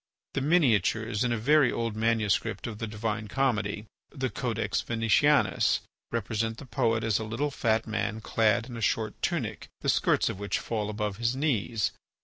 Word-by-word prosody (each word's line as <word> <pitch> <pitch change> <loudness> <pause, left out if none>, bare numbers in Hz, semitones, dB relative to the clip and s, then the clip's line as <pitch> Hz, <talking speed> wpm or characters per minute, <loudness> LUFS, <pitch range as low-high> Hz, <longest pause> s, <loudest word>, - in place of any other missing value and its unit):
The 135 - -1
miniatures 115 - +2
in 125 - +1
a 120 - +1
very 145 +4 +4
old 115 -2 -2
manuscript 110 -2 0
of 110 -3 -5
the 115 - -3
"Divine 110 0 -3
Comedy," 105 -4 0 0.2
the 130 -3 -3
"Codex 110 -2 -1
Venetianus," 115 -2 +3 0.3
represent 115 -1 -1
the 140 - -9
poet 115 -2 0
as 110 -2 +1
a - - -3
little 120 +7 -2
fat 110 -4 +1
man 110 0 -2
clad 115 +1 +2
in 120 - -8
a 115 - -6
short 110 -1 -1
tunic, 120 - -2
the - - 0
skirts - - +3
of 95 - -3
which 100 0 -1
fall 105 -2 -3
above 105 -2 -3
his 115 +2 0
knees. 120 - 0
115 Hz, 170 wpm, -28 LUFS, 105-120 Hz, 0.3 s, very